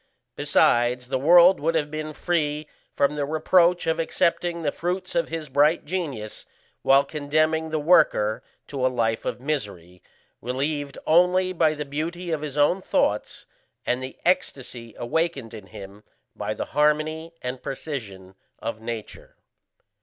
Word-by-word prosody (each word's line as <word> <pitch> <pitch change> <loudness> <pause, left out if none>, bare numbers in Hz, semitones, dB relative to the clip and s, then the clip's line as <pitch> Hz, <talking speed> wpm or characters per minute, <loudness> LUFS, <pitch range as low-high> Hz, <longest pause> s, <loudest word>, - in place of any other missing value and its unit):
Besides, 120 +1 +2
the 130 -1 0
world 175 +5 +7
would 165 +3 0
have 150 -2 0
been 155 0 -4
free 150 -3 -1 0.2
from 140 +1 +1
the 150 -1 -2
reproach 170 +4 +3
of 160 0 0
accepting 170 +1 0
the 145 - +1
fruits 180 +2 -3
of 170 - 0
his 160 -1 -4
bright 145 +4 +2
genius 145 - -5 0.3
while 135 +1 +5
condemning 155 +2 0
the 155 - -1
worker 150 -9 +3 0.3
to 135 -3 -3
a - - +5
life 115 -3 -1
of - - -3
misery, 100 - -4 0.4
relieved 140 +3 -3
only 180 +3 +3
by 155 -3 +2
the 150 0 -4
beauty 165 +5 -4
of 155 -2 -1
his 150 -2 -5
own 160 +6 +3
thoughts 105 - -1 0.4
and 125 +1 0
the 130 0 -7
ecstasy 125 - -1
awakened 135 -2 -2
in 105 -4 -10
him 100 0 -11 0.3
by - - -3
the - - -3
harmony 155 +3 +1
and 125 0 -4
precision 105 -10 -6 0.2
of 110 -1 -5
Nature. 115 -1 -7
150 Hz, 145 wpm, -24 LUFS, 125-165 Hz, 0.4 s, world